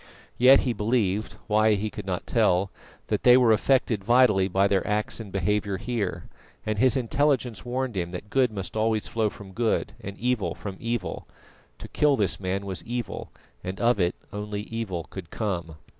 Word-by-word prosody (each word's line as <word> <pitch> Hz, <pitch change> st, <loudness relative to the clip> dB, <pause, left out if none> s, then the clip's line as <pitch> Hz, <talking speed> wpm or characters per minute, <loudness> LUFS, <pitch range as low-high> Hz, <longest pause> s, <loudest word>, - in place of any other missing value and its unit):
Yet 130 Hz, +3 st, +7 dB
he 125 Hz, -, 0 dB
believed 105 Hz, -2 st, 0 dB
why 110 Hz, 0 st, +3 dB
he 105 Hz, +1 st, -3 dB
could -, -, -8 dB
not -, -, -3 dB
tell 95 Hz, +2 st, +2 dB, 0.3 s
that -, -, -1 dB
they 125 Hz, 0 st, +7 dB
were 125 Hz, -3 st, +5 dB
affected 115 Hz, -2 st, +2 dB
vitally 110 Hz, -4 st, +4 dB
by 95 Hz, +1 st, +2 dB
their 95 Hz, -1 st, 0 dB
acts 105 Hz, +2 st, -1 dB
and 105 Hz, -4 st, -8 dB
behaviour 100 Hz, +1 st, 0 dB
here; 115 Hz, +1 st, -3 dB, 0.4 s
and 110 Hz, -1 st, -1 dB
his 130 Hz, +2 st, +4 dB
intelligence 130 Hz, -2 st, 0 dB
warned 125 Hz, -1 st, -2 dB
him 85 Hz, -2 st, -2 dB
that 95 Hz, +4 st, -8 dB
good 130 Hz, -3 st, +3 dB
must 95 Hz, -2 st, -6 dB
always 110 Hz, 0 st, +1 dB
flow 110 Hz, -2 st, 0 dB
from 100 Hz, -1 st, -12 dB
good, 115 Hz, +3 st, 0 dB
and 100 Hz, 0 st, -7 dB
evil 115 Hz, -8 st, -1 dB
from 95 Hz, -2 st, -7 dB
evil. 115 Hz, -4 st, -3 dB, 0.5 s
To -, -, -9 dB
kill 150 Hz, -2 st, +3 dB
this 100 Hz, -4 st, 0 dB
man 95 Hz, +1 st, -2 dB
was 95 Hz, -4 st, -5 dB
evil, 120 Hz, -1 st, -5 dB, 0.3 s
and 95 Hz, +1 st, -5 dB
of 120 Hz, -2 st, +3 dB
it 90 Hz, 0 st, +1 dB, 0.2 s
only 105 Hz, 0 st, -4 dB
evil 105 Hz, -7 st, -4 dB
could 90 Hz, -4 st, -8 dB
come. 90 Hz, -7 st, -3 dB
105 Hz, 180 wpm, -26 LUFS, 95-120 Hz, 0.5 s, Yet